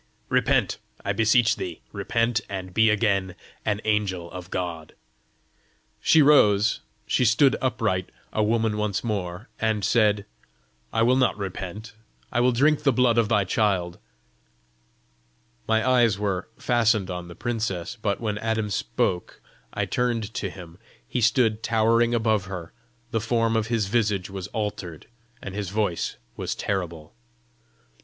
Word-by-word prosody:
Repent, - - +2 0.3
I - - +1
beseech 115 +1 +3
thee; 85 -3 -6
repent, 115 0 0
and 95 -2 -5
be 110 +2 +4
again 100 -4 +1 0.3
an 105 -1 -1
angel 95 -5 -1
of 90 0 -8
God!" 85 -4 -4 1.1
She 160 -2 +5
rose, 105 -8 +5 0.3
she - - +1
stood 125 +4 +4
upright, 110 -7 0 0.2
a 110 - +1
woman 110 0 +1
once 105 -2 -1
more, 100 -2 -3
and 110 -3 0
said, 105 -3 +3 0.7
"I 115 - +2
will 125 +2 +4
not 130 - +2
repent. 100 +2 -6 0.4
I - - +1
will 125 +1 +4
drink 145 +5 +3
the 140 - +3
blood 120 -1 +3
of 110 -2 +1
thy 105 -3 +3
child." 90 -3 0 1.7
My 110 +2 +2
eyes 120 -5 +4
were 100 -3 -2
fastened 115 -5 +2
on 90 -1 -5
the 85 - -10
princess; 110 -5 -3
but 100 -2 0
when 105 -3 -2
Adam 110 -1 -1
spoke, 90 -2 -1 0.3
I - - -1
turned 115 -3 -1
to 105 -5 -3
him: 90 -1 -12 0.3
he 125 - -2
stood 115 -1 +3
towering 115 +1 +2
above 110 -3 +1
her; 90 -3 -7 0.4
the 115 - 0
form 115 0 +1
of 110 -1 +1
his 115 -3 0
visage 100 -3 0
was 95 -2 -5
altered, 100 -7 -5 0.4
and 95 - -6
his 100 -2 -3
voice 100 -4 -1 0.2
was - - -3
terrible. 85 -5 -4
105 Hz, 145 wpm, -25 LUFS, 95-115 Hz, 1.7 s, She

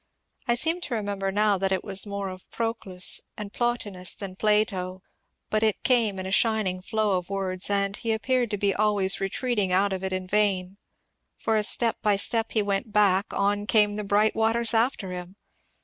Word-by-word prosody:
I 235 - +3
seem 325 +8 0
to 265 -8 -3
remember 200 -2 -2
now 205 -1 +2
that 195 0 0
it 190 - 0
was 195 0 0
more 200 -2 -4
Proclus 220 -6 -1 0.2
and 210 -2 -7
Plotinus 210 -7 -2
than 195 -2 -6
Plato, 195 -3 0 0.5
but 215 - +1
it 220 -2 0
came 230 -6 +2
in 185 - -4
a 190 - -4
shining 210 -4 +1
flow 210 -1 0
of 180 - -13
words, 190 -1 -2
and 200 -1 +1
he 230 - -2
appeared 240 +2 0
to 205 - -2
be 200 0 +1
always 205 -2 +1
retreating 205 0 -1
out 195 +2 +2
of 190 0 -4
it 190 - -2
in 185 0 -3
vain, 195 -2 0 0.6
for 225 - 0
as 210 0 +3
step 230 -2 +1
by 210 -1 +3
step 225 +3 +2
he 215 - +2
went 200 +2 -2
back, 200 -1 +3
on 205 +1 0
came 210 -1 +3
the 210 - -3
bright 205 +2 +2
waters 225 +1 +1
after 225 -4 +1
him. 180 +1 -7
205 Hz, 190 wpm, -26 LUFS, 190-220 Hz, 0.6 s, I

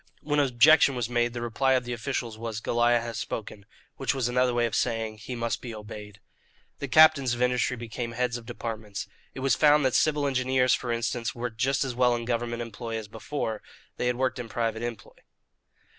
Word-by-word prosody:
When 150 -1 +1
objection 140 +2 +5
was 120 -1 -2
made, 120 0 +1
the 120 -1 -4
reply 130 +3 +1
of 130 -1 +2
the 120 - -3
officials 120 -2 -3
was 110 -1 -5
"Goliah 120 +1 +2
has 115 -1 -5
spoken" 100 -2 -6 0.3
which - - 0
was 130 -3 0
another 125 +1 +2
way 120 0 +1
of 115 - -3
saying, 110 -3 -1
"He 125 +3 -6
must 115 -1 -2
be 120 -3 -7
obeyed." 105 -1 -9 0.6
The 140 - -3
captains 140 -3 +6
of 120 - -6
industry 125 0 +1
became 115 0 -5
heads 125 0 -1
of 120 -1 -7
departments. 110 -5 -5 0.3
It 130 - -6
was 135 0 +3
found 150 -1 +5
that 130 - +2
civil 150 +1 +2
engineers, 130 -2 +2
for 120 - -1
instance, 115 0 -2
worked 120 -2 -5
just 135 +2 +2
as 130 - -3
well 125 0 +3
in 120 0 -4
government 120 0 -2
employ 115 0 -5
as 110 -2 -6
before, 110 0 -4 0.4
they 125 - -1
had 125 - +1
worked 130 0 -1
in 120 -2 -6
private 115 -1 -2
employ. 120 -3 -6
120 Hz, 205 wpm, -27 LUFS, 115-130 Hz, 0.6 s, captains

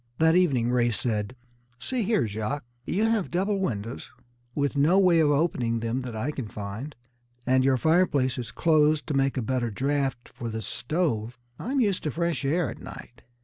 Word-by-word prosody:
That 160 +1 +4
evening 135 -10 +3
Ray 120 -1 +3
said: 110 0 -2 0.4
"See 250 - -2
here, 215 - +2
Jacques, 110 +6 -3 0.2
you 200 +5 +1
have 225 -4 +1
double 195 +3 0
windows, 115 - -3 0.5
with 145 0 0
no 150 +7 +4
way 180 -4 +5
of 155 -2 +4
opening 140 -6 +1
them 115 +3 -1
that 125 -3 -6
I 125 +7 -2
can 130 -6 -5
find, 105 +8 -6 0.5
and 130 +1 +3
your 130 -1 +3
fireplace 145 -5 +2
is 120 - -5
closed 155 -2 +3
to 150 - -3
make 135 0 +1
a 125 - 0
better 125 0 -1
draft 135 +1 -1
for 115 - -7
this 110 -2 -4
stove. 125 - -1 0.2
I'm 270 +3 -1
used 205 -6 +1
to - - +1
fresh 170 0 -1
air 160 +5 +1
at - - -10
night. 120 - -11
135 Hz, 185 wpm, -26 LUFS, 120-170 Hz, 0.5 s, way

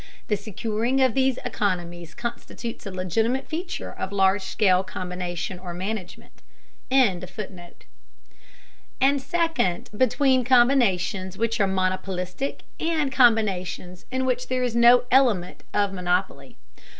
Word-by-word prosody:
The 210 - +3
securing 220 +5 -2
of 260 -3 +3
these 265 -1 +2
economies 175 -7 -3
constitutes 235 -1 -6
a - - -5
legitimate 220 +8 -1
feature 345 +3 -5
of 190 - -5
large 195 0 +3
scale 190 -1 +2
combination 180 -1 -5
or 180 -1 -7
management.]; 185 0 -6 0.5
and 235 -10 +3 2.0
second, 280 - 0
between 260 +2 +3
combinations 220 -7 +2
which 230 0 0
are 200 - +3
monopolistic 185 +4 -2 0.2
and 315 -4 0
combinations 195 -7 +1
in 260 0 -1
which 250 -1 -1
there 255 0 -1
is 245 -2 -1
no 235 +1 +6
element 240 -9 +2
of 205 -1 +1
monopoly. 180 0 -2
210 Hz, 115 wpm, -24 LUFS, 185-255 Hz, 2.0 s, no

